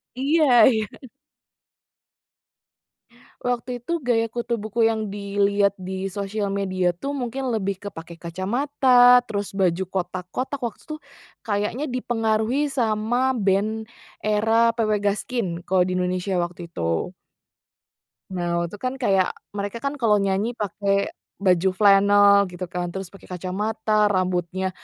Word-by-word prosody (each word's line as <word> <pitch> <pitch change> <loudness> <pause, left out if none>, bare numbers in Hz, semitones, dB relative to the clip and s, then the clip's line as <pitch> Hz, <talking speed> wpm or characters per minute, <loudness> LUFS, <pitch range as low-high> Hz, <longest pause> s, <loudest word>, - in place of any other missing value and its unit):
Iya 295 +5 +2 0.3
iya. 220 -1 -1
Hmm. 260 - -13 2.3
Waktu 245 0 -2
itu 340 +6 -2
gaya 230 -4 0
kutu 240 0 -2
buku 220 +2 +1
yang 220 -2 -1
dilihat 200 0 +1
di 190 0 -5
sosial 200 +1 -3
media 185 -3 0
tuh 275 +11 -5
mungkin 260 0 -3
lebih 200 -4 -2
ke 205 - -4
pakai 165 0 -10
kacamata, 245 - +4
terus 205 -2 -3
baju 190 -2 +1
kotak-kotak, 185 +9 -4
waktu 235 -3 -4
itu 310 -1 -5 0.5
kayaknya 210 +7 -2
dipengaruhi 240 +3 0
sama 240 +1 +1
band 215 +1 0 0.3
era 225 +2 +3
PW 215 -2 +1
Gaskin 210 +2 -1 0.2
kalau 185 -1 +3
di 185 0 -1
Indonesia 180 +1 -1
waktu 175 -1 -4
itu. 85 - -2 1.2
Nah, 175 -1 -1
waktu 170 - -6
itu 205 - -8
kan 255 0 -2
kayak, 195 -7 +1 0.2
mereka 205 +2 -4
kan 280 0 -3
kalau 220 -3 +4
nyanyi 200 +4 0
pakai 200 0 -1 0.2
baju 185 -1 +2
flanel 200 0 +5
gitu 180 0 -6
kan, 175 0 -3
terus 190 -2 -5
pakai 195 - -15
kacamata, 210 +3 0
rambutnya 185 -1 -1
205 Hz, 130 wpm, -23 LUFS, 190-235 Hz, 2.3 s, flanel